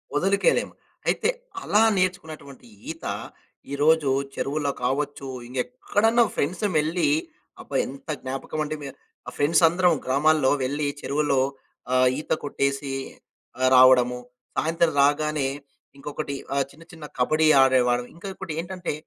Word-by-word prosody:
ఒదలుకోలేము. 195 - +2 0.3
అయితే, - - +1 0.3
అలా 210 +2 +3
నేర్చుకున్నటువంటి 160 -8 -3 0.2
ఈత, 165 - -10 0.7
ఈరోజు 150 0 +3 0.3
చెరువులో 145 0 -1
కావచ్చు, 140 +1 -2 0.2
ఇంగెక్కడన్నా 225 - +1
ఫ్రెండ్సుమెళ్ళీ 165 -1 0 0.5
అబ్బా! - - -8
ఎంత 135 +4 -11
జ్ఞాపకవండి, 150 +4 -4
మే 140 - -6 0.4
ఆహ్, - - -7
ఫ్రెండ్సందరం 170 +3 +4
గ్రామాల్లో 145 +1 +3
వెళ్లి 145 +3 -1
చెరువుల్లో 140 -1 +1 0.5
ఆహ్, 130 0 +5
ఈత - - -9
కొట్టేసీ 140 -1 -2 0.7
ఆహ్, 130 - +4
రావడము. 125 -1 +6 0.4
సాయంత్రం 165 0 +1
రాగానే 145 0 +2 0.5
ఇంకొకటి 145 0 -5 0.2
ఆహ్, 140 -1 +1
చిన్న 165 +3 -16
చిన్న 160 -2 -10
కబడీ 155 +5 +3
ఆడేవాళ్ళమి. 125 -2 +2
ఇంకా 195 +3 -8
ఇంకోటేంటంటే, 175 0 -5
150 Hz, 105 wpm, -24 LUFS, 135-165 Hz, 0.7 s, రావడము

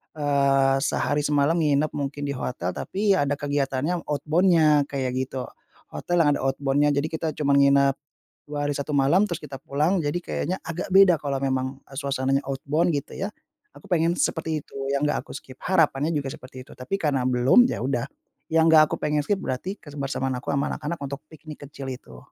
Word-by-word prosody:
eee, 140 -2 +2
sehari 145 +1 0
semalam 145 +2 +2
nginep, 150 -1 +2
mungkin, 145 0 -4
di 140 - -2
hotel 125 -9 -3
tapi 200 - -1
ya 145 -6 +1
ada 145 - 0
kegiatannya, 145 +3 -2
outbound-nya, 155 0 +3
kayak 135 -3 -2
gitu. 130 0 -3 0.5
Hotel 175 -1 0
yang 150 - +3
ada - - -6
outbound-nya. 140 +2 +1
Jadi, 140 +2 0
kita 160 0 -3
cuman 140 -2 +1
nginep 140 -1 +4 0.6
2 150 - -4
hari 145 - -1
1 140 +2 -4
malam, 155 +9 +4
terus 170 - -2
kita 140 -2 -7
pulang 155 +7 +1
jadi 145 +3 -1
kayaknya 175 0 -3
agak 165 +2 -4
beda 190 -1 +7
kalau 140 -2 -1
memang, 130 0 -2
e - - -21
suasananya 135 -1 0
outbound, 150 +6 0
gitu 140 - -9
ya. 195 - -3 0.5
Aku - - -14
pengen 170 -3 +2
seperti 160 - 0
itu - - -21 0.2
yang 140 +1 +1
nggak - - -1
aku - - -20
skip. 130 - -11
Harapannya 160 -5 +2
juga 145 -4 -2
seperti 130 0 -11
itu. - - -15
Tapi 130 +10 -4
karena 145 -7 0
belum, 130 - +5
ya - - -3
udah. 125 -1 -1 0.4
Yang 160 0 +4
gak 155 - +9
aku - - -1
pengen 150 0 0
skip, 200 +7 0
berarti 190 +5 -4
kebersamaan 135 -2 -4
aku - - -5
sama 140 +1 0
anak-anak 155 +3 -4
untuk 140 0 -6
piknik 155 -1 -12
kecil 140 -2 -8
itu. 65 - -14
145 Hz, 190 wpm, -24 LUFS, 135-160 Hz, 0.6 s, gak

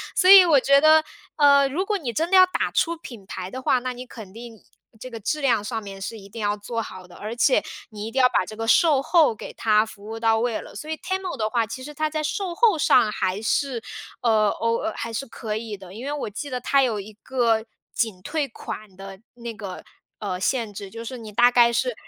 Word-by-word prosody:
所 370 -2 +4
以 385 -2 +11
我 310 -5 +5
觉 280 0 +5
得， 310 +1 +6 0.3
呃， 280 -2 +5
如 345 +8 -2
果 420 -1 0
你 255 -9 -5
真 330 - -1
的 380 - +6
要 370 - +9
打 365 - -2
出 335 0 +1
品 235 -11 -11
牌 185 -1 -7
的 260 - -6
话， 255 - +2
那 255 +1 -4
你 250 +1 -8
肯 220 -6 -11
定 230 -2 -11 0.4
这 255 - -8
个 230 -2 -8
质 300 +8 -2
量 240 -6 +2
上 220 +1 -4
面 195 -1 -9
是 225 +3 -5
一 200 -1 -13
定 225 +2 -8
要 205 0 0
做 230 +3 -4
好 185 -3 -9
的， 180 - -16
而 215 +3 -6
且 - - +3 0.3
你 210 -2 -7
一 - - -7
定 265 - +1
要 250 - +6
把 185 - +1
这 215 - -9
个 225 - -4
售 290 +3 +4
后 300 -6 +3
给 - - -8
它 215 -1 +2
服 205 -2 -13
务 225 +1 -6
到 225 -1 +2
位 235 -1 -1
了。 - - -12
所 305 - -8
以 315 - -1
TEMU 375 -3 -3
的 215 -3 -1
话， 230 -1 +1
其 230 +4 -8
实 295 +1 -8
它 310 +1 -1
在 310 0 -3
售 360 +2 -3
后 425 -8 +3
上 235 -6 +4
还 190 +2 -2
是， 245 +1 -1 0.4
呃， 220 -3 +3
哦 230 +10 -1
还 230 - -5
是 230 +5 -3
可 220 -3 -5
以 220 -2 -6
的， 190 -2 -13
因 235 +5 -8
为 290 - -3
我 290 -7 -4
记 285 +8 -6
得 250 -1 -4
它 275 +2 +3
有 235 -5 +1
一 210 +2 -11
个 230 -4 +1 0.3
仅 215 -6 -2
退 295 - -2
款 215 -4 -9
的 195 0 -10
那 235 -1 -7
个， 200 -4 -8 0.4
呃， 190 -4 -4
限 225 +1 -1
制， 200 0 -8
就 230 +3 -8
是 255 +2 -6
你 220 -2 -9
大 240 +3 +5
概 235 -1 +5
是 250 +1 0
235 Hz, 275 characters per minute, -23 LUFS, 215-280 Hz, 0.4 s, 以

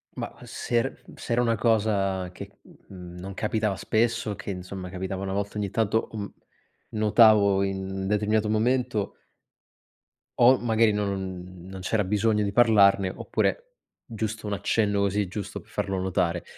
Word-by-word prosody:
Ma - - -5
se 120 - -4
er - - -4
se - - -8
era 120 - +3
una 115 -1 +2
cosa 100 -5 +1
che 90 - -9 0.4
n 90 -2 -10
non 95 +2 -7
capitava 105 -1 0
spesso, 110 +1 0
che 100 +1 -8
insomma 90 -1 -6
capitava 95 +1 -4
una 95 0 -3
volta 100 +1 -3
ogni 100 -1 -1
tanto, 110 +1 0
uhm, 105 -2 -6 0.6
notavo 105 -2 +5
in 95 0 -3
determinato 105 +1 +1
momento 120 -1 0 1.2
o 125 +2 +6
magari 115 -2 +2
non 95 -3 -4
non 95 -1 -8
c'era 105 +3 0
bisogno 105 +2 +1
di 100 - -1
parlarne 100 -4 +5
oppure - - -2 0.3
giusto 110 -1 -4
un 105 - -2
accenno 100 0 +1
così, 100 0 +1
giusto 100 +2 -6
per - - -19
farlo 95 -1 -2
notare. 90 -2 0
100 Hz, 150 wpm, -26 LUFS, 95-110 Hz, 1.2 s, o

